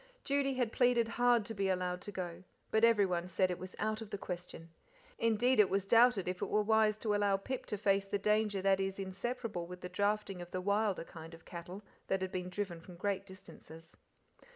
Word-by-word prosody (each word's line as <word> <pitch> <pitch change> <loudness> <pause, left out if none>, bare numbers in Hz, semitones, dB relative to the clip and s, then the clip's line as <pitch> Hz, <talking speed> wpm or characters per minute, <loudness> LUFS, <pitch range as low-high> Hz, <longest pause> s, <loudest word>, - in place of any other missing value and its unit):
Judy 275 -1 +1
had 245 -3 0
pleaded 245 -2 +3
hard 240 -1 +3
to 225 - -5
be 195 -2 0
allowed 180 -1 -1
to 205 - -7
go, 180 -2 -5 0.3
but 220 +1 +2
everyone 195 -6 +3
said 185 +1 +1
it 180 - -4
was 185 0 -8
out 215 +1 -1
of 220 - -7
the 205 - -4
question 175 -3 -7 0.5
indeed, 230 +2 +3
it 210 - +6
was 195 0 0
doubted 230 -2 +5
if 180 0 -3
it - - -2
were 210 0 +2
wise 215 0 +3
to 215 -1 -1
allow 205 -1 +2
Pip 255 +6 -5
to 210 - -3
face 195 -1 +2
the 205 - 0
danger 210 -1 +1
that 195 -1 +4
is 195 0 -2
inseparable 195 -1 -4
with 180 +1 -9
the 180 - -6
drafting 205 0 -1
of 175 - -8
the 185 - -3
wilder 200 0 +1
kind 165 0 -10
of 165 - -18
cattle 175 +4 -8 0.2
that 190 -1 0
had 185 - -3
been 180 -1 -3
driven 180 -3 -4
from 180 +1 -12
great 195 +2 -2
distances. 165 -3 -12
195 Hz, 215 wpm, -34 LUFS, 180-215 Hz, 0.5 s, it